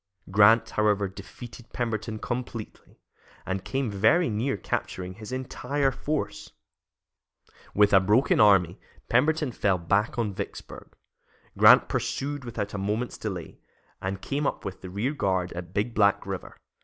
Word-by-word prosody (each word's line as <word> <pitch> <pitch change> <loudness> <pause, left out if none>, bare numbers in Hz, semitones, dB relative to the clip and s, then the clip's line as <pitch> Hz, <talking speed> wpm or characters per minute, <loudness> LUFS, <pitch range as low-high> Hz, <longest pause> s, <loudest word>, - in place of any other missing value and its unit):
Grant, 110 +3 +5
however, 105 -2 +2
defeated 110 +5 -11
Pemberton 110 -2 -3
completely, 120 -1 -6 0.5
and 95 0 -3
came 135 -1 -2
very 110 - +3
near 120 +6 -1
capturing 90 0 -4
his 110 +4 -10
entire 130 +2 -1
force. 125 -7 -4 1.2
With 105 0 +4
a 95 - +8
broken 105 +8 +3
army, 95 -5 +5 0.3
Pemberton 150 +3 +2
fell 100 -4 +1
back 100 +7 0
on 110 -4 -1
Vicksburg. - - -8 0.6
Grant - - +7
pursued 145 -1 -3
without 110 -4 -4
a 100 - -3
moment's 105 +5 -2
delay, 95 -6 -6 0.4
and 95 +1 -4
came 140 +1 -1
up - - -3
with 95 -1 -6
the 95 - -8
rear 105 +10 -2
guard 95 -9 -1
at 85 0 -7
Big 105 +5 -1
Black 100 -2 +3
River. - - -6
105 Hz, 140 wpm, -26 LUFS, 100-125 Hz, 1.2 s, a